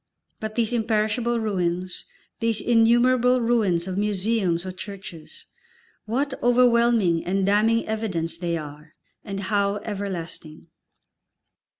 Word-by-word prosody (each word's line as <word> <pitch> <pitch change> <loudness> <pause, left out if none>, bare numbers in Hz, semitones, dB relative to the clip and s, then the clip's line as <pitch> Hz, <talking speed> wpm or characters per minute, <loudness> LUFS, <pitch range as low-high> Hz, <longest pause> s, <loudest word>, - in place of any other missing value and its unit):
But 220 0 -5
these 235 0 +1
imperishable 225 +1 0
ruins, 185 -4 -2 0.3
these 230 -2 +1
innumerable 245 +2 +4
ruins 215 -8 +1
of 190 +1 -2
museums 200 -3 0
or 185 - -4
churches, 185 -4 -9 0.6
what 265 +6 -1
overwhelming 235 -7 +3
and 190 +1 0
damning 215 +3 +2
evidence 190 -7 -2
they 170 -1 -2
are, 150 +1 -10 0.3
and 195 -2 -5
how 200 0 0
everlasting! 180 -6 -6
210 Hz, 105 wpm, -24 LUFS, 180-230 Hz, 0.6 s, innumerable